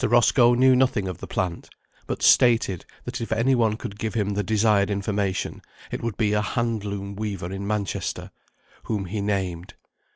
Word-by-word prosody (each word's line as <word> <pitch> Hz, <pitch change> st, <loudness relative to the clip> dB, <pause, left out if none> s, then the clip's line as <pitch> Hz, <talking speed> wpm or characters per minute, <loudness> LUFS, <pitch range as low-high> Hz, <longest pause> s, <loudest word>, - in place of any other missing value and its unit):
Roscoe 120 Hz, 0 st, +5 dB
knew 130 Hz, +1 st, +5 dB
nothing 125 Hz, -6 st, +2 dB
of 90 Hz, -3 st, -5 dB
the -, -, -7 dB
plant; 90 Hz, -2 st, -3 dB, 0.4 s
but -, -, -4 dB
stated, 115 Hz, -7 st, +4 dB, 0.2 s
that 125 Hz, 0 st, -5 dB
if 115 Hz, -, -5 dB
any 115 Hz, +4 st, +2 dB
one 110 Hz, -3 st, +2 dB
could 100 Hz, -2 st, -7 dB
give 110 Hz, 0 st, -3 dB
him 105 Hz, -2 st, 0 dB
the 100 Hz, +1 st, 0 dB
desired 105 Hz, 0 st, +2 dB
information, 100 Hz, -1 st, -2 dB, 0.3 s
it -, -, -4 dB
would 115 Hz, -4 st, -3 dB
be 105 Hz, -2 st, +1 dB
a 105 Hz, -, +2 dB
hand 115 Hz, 0 st, -1 dB
loom 100 Hz, -1 st, -5 dB
weaver 100 Hz, -4 st, -4 dB
in 95 Hz, +1 st, -5 dB
Manchester, 105 Hz, -2 st, -3 dB, 0.5 s
whom 105 Hz, -3 st, -2 dB
he 100 Hz, +3 st, -3 dB
named. 95 Hz, -4 st, -2 dB
105 Hz, 175 wpm, -24 LUFS, 100-115 Hz, 0.5 s, Roscoe